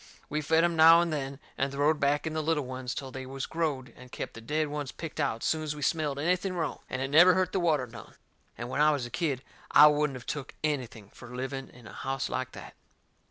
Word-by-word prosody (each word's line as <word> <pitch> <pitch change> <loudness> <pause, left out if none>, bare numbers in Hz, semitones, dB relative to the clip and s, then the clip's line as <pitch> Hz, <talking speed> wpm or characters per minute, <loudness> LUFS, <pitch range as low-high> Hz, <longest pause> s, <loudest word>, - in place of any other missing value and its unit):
We 150 +1 -1
fed 160 +2 +3
em 170 -1 +2
now 165 +1 +8
and 170 -2 0
then, 140 -2 -4 0.2
and 135 +1 0
throwed 145 +2 +2
back 145 +2 +1
in 160 - -2
the 155 - -1
little 155 -2 0
ones 130 0 -5
till 135 -2 -5
they 130 0 -7
was 135 0 -4
growed, 150 -6 -2
and 125 0 -14
kep' - - -5
the 115 - -10
dead 150 +6 -1
ones 145 -2 -4
picked 160 -2 -7
out 135 -6 -1
soon's 155 -1 -1
we 145 - -6
smelled 150 -2 0
anything 180 +5 0
wrong, 165 -4 -2
and 130 0 -2
it - - -1
never 175 +6 +7
hurt 185 -1 +1
the 190 - 0
water 155 -7 +2
none; 120 -2 -12 0.4
and 120 +2 -5
when 140 - -1
I 150 - +6
was 145 -5 0
a 120 - -9
kid 140 -7 -1 0.3
I 150 - +8
wouldn't 150 -2 +3
of 120 - -12
took 145 -2 -5
anything 120 -9 -3
fur 125 0 -11
living 135 +1 -4
in 125 -2 -16
a - - -11
house 135 0 -3
like 130 0 -3
that. - - -10
145 Hz, 245 wpm, -29 LUFS, 130-155 Hz, 0.4 s, now